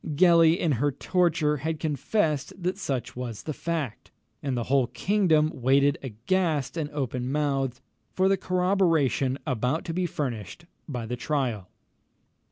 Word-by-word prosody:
Gellie, 170 0 +6
in 165 - +1
her 145 +4 +1
torture, 160 0 +1
had 160 +3 -3
confessed 155 - 0
that 185 +2 -1
such 130 - -3
was 120 -4 -5
the 155 - -3
fact, 155 -7 -4 0.3
and 135 -3 -2
the 120 - -1
whole 130 0 +2
kingdom 160 - +2
waited 135 +3 +3
aghast 140 - -1
and 155 -3 -2
open 130 -3 -3
mouthed 135 -4 -1 0.3
for 185 +1 +3
the 195 - +4
corroboration 180 -9 +1
about 130 +2 -1
to 165 - -3
be 180 +1 0
furnished 125 - -5 0.2
by 120 -5 -4
the 120 +2 -3
trial. 120 -9 -2
145 Hz, 145 wpm, -26 LUFS, 130-170 Hz, 0.3 s, Gellie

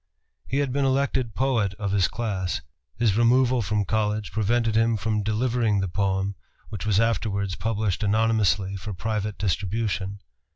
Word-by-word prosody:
He 135 - -1
had 140 -3 0
been 140 0 +1
elected 130 -3 0
poet 115 -8 +1
of 100 -1 -3
his 95 -2 +3
class. 100 -6 -2 0.3
His 110 -4 +2
removal 125 +2 +4
from 105 -1 0
college 105 +1 -1
prevented 110 +1 +1
him 115 0 +3
from 105 +1 -1
delivering 110 0 +1
the 95 - 0
poem 95 +1 0 0.4
which 105 -1 -5
was 105 -2 +3
afterwards 100 -4 0
published 110 -1 -1
anonymously 105 -2 +2
for 100 +1 -6
private 105 +1 -2
distribution. 100 0 -1
110 Hz, 150 wpm, -25 LUFS, 100-115 Hz, 0.4 s, removal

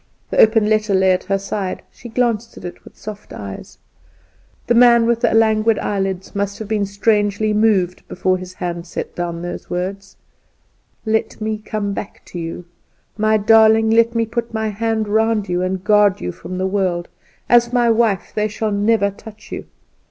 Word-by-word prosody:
The - - 0
open 220 -1 +5
letter 215 -2 +2
lay 190 0 +4
at 180 - 0
her 195 - +1
side; 195 -1 -4
she 240 - -11
glanced 230 -1 -1
at - - -9
it 175 - -8
with - - -16
soft 210 0 -9
eyes. 100 -1 -8 0.9
The 240 - +2
man 235 -1 +6
with 235 0 +1
the 240 - +3
languid 220 0 +3
eyelids 195 -2 -2
must 200 0 -2
have 220 - -7
been 210 -2 0
strangely 205 +1 +1
moved 205 -5 +1
before 185 0 0
his 185 0 -9
hand 175 -1 -4
set - - -5
down 170 -1 -4
those 175 0 -6
words: 195 +2 -4 0.9
"Let 220 0 -1
me 215 0 -2
come 210 -2 -3
back 195 - -7
to 175 - -4
you! 165 +1 -6 0.5
My 215 0 +2
darling, 220 +1 +5
let 230 +1 +3
me 230 0 +2
put 235 +1 -4
my 220 0 -1
hand 220 +1 -1
round 220 0 +1
you, 180 0 -1
and 185 0 -2
guard 210 -2 +4
you 90 - -3
from 185 - -9
all - - -3
the 185 - -1
world. 185 -3 -1 0.4
As 240 0 +4
my 240 -2 +3
wife 225 -5 +1
they 210 0 0
shall 215 0 -3
never 205 0 +2
touch 215 +1 -14
you. - - -5
210 Hz, 185 wpm, -19 LUFS, 190-225 Hz, 0.9 s, man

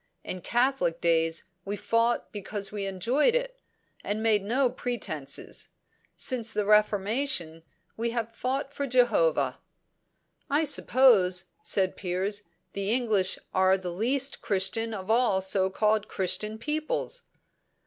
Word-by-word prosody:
In 185 - -5
Catholic 240 -7 +1
days 165 -1 +1 0.2
we 200 +2 -4
fought 230 +3 0
because 205 -1 -4
we 205 -2 -3
enjoyed 240 - +1
it, - - -2 0.4
and 215 +2 -2
made 215 -2 +3
no 250 +7 +1
pretences; 200 - -4 0.5
since 235 -4 0
the 210 -2 -1
Reformation 210 - +2 0.4
we 230 +1 -1
have 230 -1 -3
fought 270 +4 -3
for 280 -1 -3
Jehovah." 255 - +2 0.9
"I 290 +3 +2
suppose," 225 - +4
said 190 -2 +1
Piers, 195 +3 -2 0.3
"the 200 +1 -2
English 220 -6 +2 0.2
are 190 0 +4
the 180 -2 -5
least 260 +8 0
Christian 205 +3 -1
of 190 +1 -4
all 230 -5 +3
so 190 0 +1
called 215 +2 +1
Christian 210 +3 -2
peoples." 310 - -3
215 Hz, 125 wpm, -27 LUFS, 190-250 Hz, 0.9 s, suppose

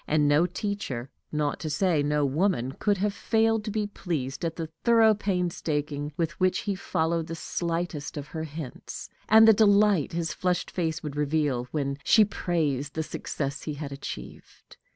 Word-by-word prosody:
And 150 -1 +3
no 150 +4 +4
teacher, 180 - -4 0.2
not 150 -1 -1
to 155 - -4
say 160 0 +2
no 145 0 +1
woman, 140 -3 +1
could 205 +8 0
have 200 +2 0
failed 225 0 +1
to - - -2
be 210 0 -1
pleased 160 -10 -4
at 165 -1 -1
the 160 -2 -5
thorough 225 -2 +6
painstaking 160 -7 -2
with 170 -1 -2
which 185 0 +2
he 205 - -1
followed 165 -3 -1
the 165 - -5
slightest 165 -3 -3
of 145 0 -6
her 160 0 -4
hints, 150 -3 -7 0.2
and 220 +1 +8
the 220 - +9
delight 205 -6 +4
his 165 -1 -1
flushed 180 -1 -1
face 160 -3 -2
would 150 -2 -5
reveal 145 -4 0
when 140 -1 -2
she 215 -2 +6
praised 150 -8 -1
the 160 - 0
success 140 -2 -4
he 150 - -4
had 145 -1 -6
achieved. 140 - -9
160 Hz, 170 wpm, -27 LUFS, 145-195 Hz, 0.2 s, the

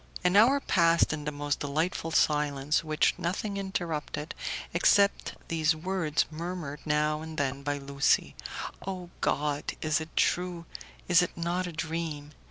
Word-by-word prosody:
An 180 +1 +3
hour 245 +7 +6
passed 170 - +3
in 150 -1 -5
the 150 - -1
most 145 0 -2
delightful 160 +4 -1
silence, 150 -1 +2
which 155 -1 +2
nothing 200 +4 -2
interrupted 170 -6 -3 0.4
except 200 +4 +3
these 160 0 +2
words 160 -3 0
murmured 165 -3 -5
now 150 0 +1
and 160 0 -8
then 140 -1 -1
by 145 +1 -1
Lucie, 140 0 +1 0.5
"Oh, 180 -2 -5
God! 145 0 0
is 155 0 +1
it 160 - -6
true? 175 -1 +1 0.4
is 175 -1 +6
it 180 - -3
not 175 +2 -1
a - - -5
dream?" 160 -2 -4
160 Hz, 145 wpm, -29 LUFS, 150-175 Hz, 0.5 s, hour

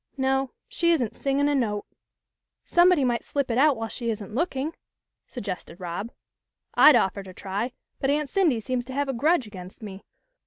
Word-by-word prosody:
No, 265 0 +1 0.2
she 340 -1 +1
isn't 250 -9 -1
singin' 280 +1 +1
a 290 - +2
note." 215 -7 0 0.5
" - - -62 0.3
Somebody 350 -4 +5
might 240 -2 +1
slip 280 -3 -2
it 230 - 0
out 290 -2 +5
while 225 0 -3
she 235 0 -4
isn't 210 -2 -4
look 315 +5 -1
ing," 285 +5 -2 0.5
suggested 195 -6 -6
Rob. 180 +5 -4 0.3
" - - -58
I'd 300 -2 +8
offer 200 -3 +2
to 185 -2 -12
try, 205 +6 -3 0.3
but 270 - 0
Aunt 295 +1 +1
Cindy 315 -7 +2
seems 250 +2 -2
to 260 - -8
have 280 +1 -1
a - - 0
grudge 285 +3 +2
against 190 0 -11
me. 195 -2 -8
255 Hz, 195 wpm, -26 LUFS, 210-285 Hz, 0.5 s, I'd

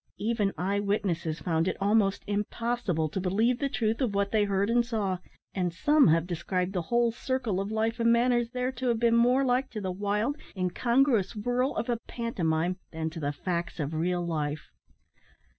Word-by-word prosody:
Even 210 -2 0
eye 195 +5 0
witnesses 180 -6 -1
found 165 -1 0
it - - -1
almost 200 0 +2
impossible, 210 -4 -1
to 175 - -4
believe 220 +7 +1
the 280 - 0
truth 225 -2 -1
of 230 -6 0
what 200 0 +1
they 215 -2 +3
heard 200 0 +1
and 240 +1 +3
saw; 210 -6 -2 0.3
and 180 -2 -1
some 295 - +4
have 165 +1 +3
described 180 +2 -2
the 180 - 0
whole 235 -1 +3
circle 245 -5 -2
of 195 - -4
life 220 +2 -1
and 230 0 +4
manners 240 0 +3
there 250 +1 -2
to 260 0 -4
have 235 -2 +2
been 235 0 +3
more 250 +3 +4
like 255 +1 +1
to 215 - -5
the 190 -2 -3
wild, 210 +8 -1 0.2
incongruous 235 +4 +2
whirl 245 +5 0
of - - -2
a 240 -2 0
pantomime 180 -7 -1
than 160 -1 -3
to 165 - -7
the 145 -2 -1
facts 170 +3 -3
of 150 +1 -2
real 175 +2 0
life. 150 -3 -3
205 Hz, 190 wpm, -28 LUFS, 180-235 Hz, 0.3 s, some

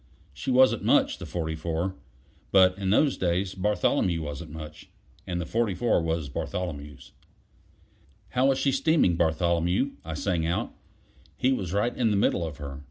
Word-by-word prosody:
She 75 - -5
wasn't 130 0 +4
much - - +3
the - - -7
44. 80 +2 -3 0.6
But 95 -1 +6
in 95 -1 -3
those 135 +7 +3
days 90 +1 0
Bartholomew 95 -3 +1
wasn't 75 -2 -6
much: 75 0 -10 0.4
and 90 -1 -2
the 85 - -3
44 110 0 +1
was 80 -2 -2
Bartholomew's. 75 -1 -5 1.2
"How 130 +2 +2
is 135 - 0
she 135 - +1
steaming, 135 - +3
Bartholomew?" 85 - +1
I 80 0 -5
sang 85 0 -1
out; 85 +2 -2 0.6
he 130 +1 +2
was 95 -9 -3
right 105 +5 0
in 120 -3 +1
the 105 - +1
middle 95 -3 +2
of 80 -3 -5
her. 70 -2 -7
90 Hz, 155 wpm, -27 LUFS, 80-105 Hz, 1.2 s, But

